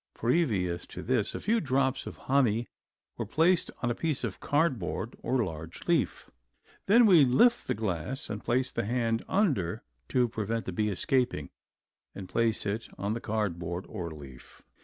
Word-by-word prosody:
Previous 105 - 0
to - - -8
this 120 -4 0
a - - -3
few 225 +2 +1
drops 130 -2 0
of - - -7
the - - -20
honey 120 -4 +2 0.5
were 115 - -1
placed 165 - +3
on 120 - +2
a - - +1
piece 155 +2 -2
of - - -3
cardboard 145 - 0
or 125 0 +1
large 80 -3 -7
leaf. - - +1 0.6
Then 230 +4 +7
we 175 -8 +7
lift 135 - +4
the - - 0
glass 105 - -3
and 105 -1 -5
place 130 +2 +1
the 115 - -2
hand 115 0 0
under 135 - +1 0.3
to 125 -1 +3
prevent 115 0 -3
the - - -3
bee 105 +3 0
escaping 125 +6 0 0.6
and 95 -2 -7
place 115 +3 +1
it 105 +3 -3
on 100 +2 -1
the 115 - -4
cardboard 90 -5 -2
or 85 -2 -5
leaf. 70 -5 -12
115 Hz, 170 wpm, -29 LUFS, 100-135 Hz, 0.6 s, Then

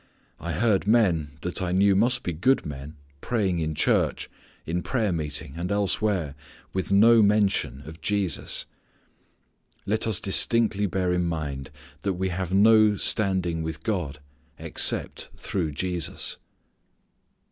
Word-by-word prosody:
I 85 -1 -4
heard 100 +2 +1
men, 95 -10 +2
that 90 +1 -2
I 90 -1 -1
knew 100 +2 +3
must 120 +5 +2
be 90 - -3
good 125 +11 +1
men, 75 +1 -7 0.3
praying 100 -7 -1
in 80 -1 -2
church, - - 0 0.3
in 85 +2 -2
prayer 110 -1 -1
meeting 75 -3 -4
and 90 +3 -4
elsewhere 100 -5 0 0.4
with 95 +1 -3
no 115 +3 +6
mention 100 -9 +1
of 80 +2 -11
Jesus. 100 -1 -1 1.2
Let 110 +3 0
us 110 -5 +2
distinctly 105 +1 +2
bear 90 -1 -1
in 90 0 0
mind 70 -5 -4 0.3
that 100 - -1
we 95 +1 -2
have 90 0 -4
no 105 +1 +5
standing 95 -5 0
with 80 0 -5
God 85 -10 -3 0.4
except 80 0 0
through 85 -6 -3
Jesus. 90 +1 -2
95 Hz, 135 wpm, -25 LUFS, 80-105 Hz, 1.2 s, no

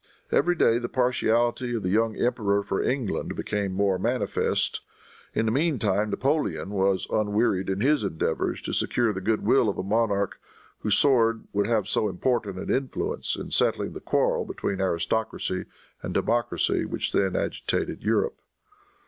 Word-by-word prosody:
Every 175 0 +3
day 115 -7 +3
the 120 - -4
partiality 120 -1 +1
of 110 - -3
the 90 - 0
young 110 +1 +2
emperor 100 -4 +1
for 100 - -1
England 125 -5 -1
became 100 -2 -2
more 95 -1 +1
manifest. 120 +6 0 0.5
In 110 - +1
the 110 - +1
meantime 110 - +1
Napoleon 100 - -1
was 95 -1 +1
unwearied 105 -2 +1
in 95 +1 -1
his 145 -1 +3
endeavors 80 -5 -1
to - - -4
secure 120 -3 +1
the 95 - -5
good 110 +2 0
will 125 -5 +4
of 100 - -3
a - - -2
monarch 100 -1 0 0.4
whose 105 -2 +2
sword 115 -5 +3
would 100 0 +1
have 110 -4 +1
so 105 0 +1
important 100 0 -1
an - - -2
influence 130 0 -2
in - - -7
settling - - +1
the - - -7
quarrel - - +1
between 95 -1 -3
aristocracy 95 +2 -1 0.4
and - - -5
democracy 120 +1 +1
which - - -2
then - - +1
agitated - - -2
Europe. 465 -1 0
110 Hz, 155 wpm, -26 LUFS, 100-120 Hz, 0.5 s, will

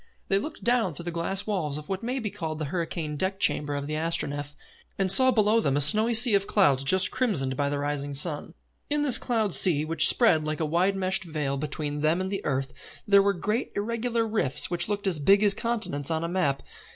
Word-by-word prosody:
They 195 - +2
looked 305 +9 -8
down 235 -9 +1
through 170 - -8
the 175 - -4
glass 170 +4 -2
walls 165 -9 -1
of 150 - -9
what 190 -1 -4
may 245 +3 -3
be 220 -6 -4
called 160 -3 -5
the 155 - -4
hurricane 165 -3 -4
deck 190 +4 -2
chamber 145 -5 +1
of 140 0 -4
the 150 - -5
Astronef, 145 -2 -2 0.4
and 190 -2 +2
saw 260 +6 +5
below 220 -2 +2
them 140 -10 0
a - - +2
snowy 215 +10 +3
sea 230 0 +6
of 200 0 +2
clouds 140 -10 +2
just 185 +6 +2
crimsoned 140 - -1
by 140 +1 -1
the 145 - -2
rising 145 0 -3
sun. 150 +2 -1 0.3
In 295 0 0
this 275 -5 +4
cloud 220 -6 -1
sea, 155 -5 +4
which 160 -1 +3
spread 180 -11 +3
like 155 -1 -3
a 160 - -1
wide 175 +5 0
meshed 190 -1 -1
veil 150 -5 -3
between 145 +1 -4
them 155 +3 +1
and 190 +1 -3
the 195 - -4
earth, 135 -2 -2 0.3
there 200 -2 +5
were 200 0 +1
great 210 +6 -3
irregular 230 +2 -2
rifts 210 - 0
which 175 +2 -2
looked 205 -1 -3
as 180 -5 0
big 195 +8 +4
as 205 -1 +3
continents 215 - -3
on 160 0 -2
a - - -2
map. 150 -6 -1
175 Hz, 225 wpm, -26 LUFS, 150-210 Hz, 0.4 s, sea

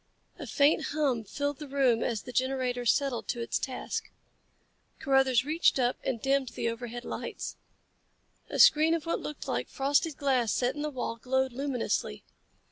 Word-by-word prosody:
A - - -6
faint 285 +1 +3
hum 270 -7 +1
filled 285 +6 -3
the 300 - -7
room 265 -4 +2
as 225 -3 -1
the 250 - -8
generator 255 -1 -1
settled 270 -2 +1
to 240 - -2
its 235 - -1
task. 260 -2 -4 0.9
Carruthers 270 -2 +3
reached 315 +1 +3
up 250 -1 +2
and 245 -3 -2
dimmed 270 +1 +1
the 230 - -2
overhead 240 +1 -6
lights. - - -5 0.9
A - - -3
screen 315 +2 +6
of 330 - -4
what 335 - -1
looked 300 - -7
like 125 0 -2
frosted 285 +3 +1
glass 260 -6 +1
set 250 +1 +1
in 295 - -6
the 300 - -1
wall 250 -4 -4
glowed 265 +2 0
luminously. 250 - -2
265 Hz, 165 wpm, -29 LUFS, 245-280 Hz, 0.9 s, screen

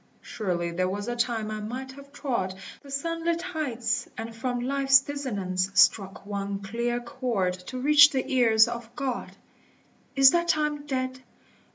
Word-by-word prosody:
Surely 175 -5 -3
there 185 +2 -1
was 205 +3 -4
a 240 - -2
time 230 -3 -1
I 215 - -4
might 255 +5 -6
have 280 +1 -14
trod 235 -10 -3 0.3
The 280 - -15
sunlit 330 +4 -2
heights, 250 -10 -2
and 225 0 -6
from 245 +1 -2
ltfe*s 270 +1 +4
dissonance 200 -11 -3
Struck 195 -2 +3
one 200 -1 -3
clear 235 +4 -2
chord 235 -6 -2
to 255 - -6
reach 290 +2 +7
the 265 -4 -2
ears 230 -4 +4
of 235 -1 -6
God: 265 -3 -4 0.8
Is 270 -1 +8
that 345 0 +1
time 300 -2 0
dead? 260 -1 -2
245 Hz, 155 wpm, -26 LUFS, 215-275 Hz, 0.8 s, Is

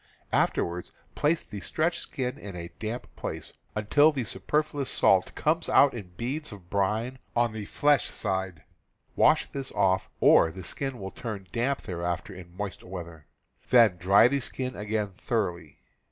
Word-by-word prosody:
Afterwards 85 +1 0 0.2
place 155 +2 +1
the 105 - -8
stretched 170 - -1
skin 125 -2 -4
in 100 -3 -8
a 85 0 -7
damp 115 +3 -5
place, - - -6 0.2
until 145 +9 +4
the 135 -4 -2
superfluous 145 +4 -1
salt 95 -1 +3
comes 160 +2 +1
out 140 - +6
in 100 -7 -8
beads 145 +6 -3
of 95 -4 -12
brine 110 +6 0 0.2
on 120 -2 +2
the 110 -2 -5
flesh 145 +6 +2
side; 95 -4 -3 0.5
wash - - +4
this 135 -1 -4
off, 95 -1 +2
or 80 - +6
the 95 +3 -9
skin 135 +7 -2
will 95 -2 -6
turn 105 -5 -6
damp 130 +4 -1
thereafter 85 +1 -3
in 90 -1 -12
moist 100 -2 -5
weather; 85 -4 -8 0.4
then 115 -7 +6
dry 95 +6 +6
the 140 +2 0
skin 130 0 -2
again 105 -1 -2
thoroughly. 90 - -3
105 Hz, 155 wpm, -28 LUFS, 95-130 Hz, 0.5 s, out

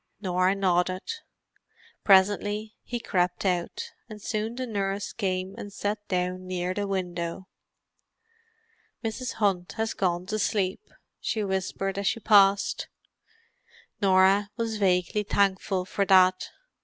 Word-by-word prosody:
Norah 185 -1 +1
nodded. 185 -1 +1 1.0
Presently 205 +2 +3
he 240 - -4
crept 180 -4 0
out; 180 -2 -1 0.2
and 215 -1 -9
soon 220 +1 -3
the 255 +1 -3
nurse 200 -3 -2
came 185 -2 -2
and 205 - -7
sat 205 +1 -2
down 185 0 -2
near 180 0 -2
the 205 +1 -2
window. 180 -1 -3 1.6
"Mrs. 240 +3 -3
Hunt 180 -6 0
has 225 0 -2
gone 180 -2 -1
to 215 +3 -2
sleep," 200 - 0 0.4
she 220 - -1
whispered 195 0 -2
as 200 - -1
she - - +1
passed. 200 -2 +4 1.1
Norah 195 +1 +4
was 225 -2 -2
vaguely 185 +1 +2
thankful 195 -2 +1
for 200 +2 -1
that. 185 -1 +4
195 Hz, 120 wpm, -27 LUFS, 185-210 Hz, 1.6 s, passed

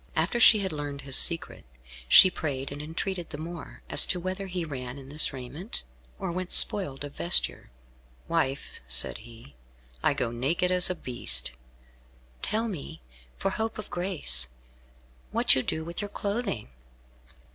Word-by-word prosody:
After 240 - 0
she 220 -2 +7
had 190 -2 -2
learned 145 -2 -5
his 135 -1 +1
secret, 165 +2 +3 0.4
she 185 - +8
prayed 140 -5 -4
and 145 +1 -7
entreated 170 +3 -4
the 145 - -7
more 165 +2 -9
as - - +9
to 180 - -1
whether 185 +2 -5
he 180 -2 -4
ran 130 -3 -7
in 135 0 -12
his 150 +1 +3
raiment, 140 - -7 0.3
or 190 -3 -4
went 185 +1 -5
spoiled 185 -11 +4
of 145 -1 -8
vesture. 175 - 0 0.6
"Wife," 155 -5 -2
said 65 +8 +1
he, 115 -9 -15 0.5
"I - - +2
go 115 - -2
naked 150 +10 -1
as 180 0 +4
a 185 - -2
beast." 65 - -3 0.9
"Tell 225 +2 0
me, 160 -5 -8 0.3
for 195 - -1
hope 220 +3 -3
of 215 - -8
grace, 160 - 0 0.8
what - - +3
you 130 - +1
do 160 +4 -3
with 170 +3 -5
your 205 - -5
clothing?" 200 - -4
160 Hz, 155 wpm, -27 LUFS, 135-185 Hz, 0.9 s, as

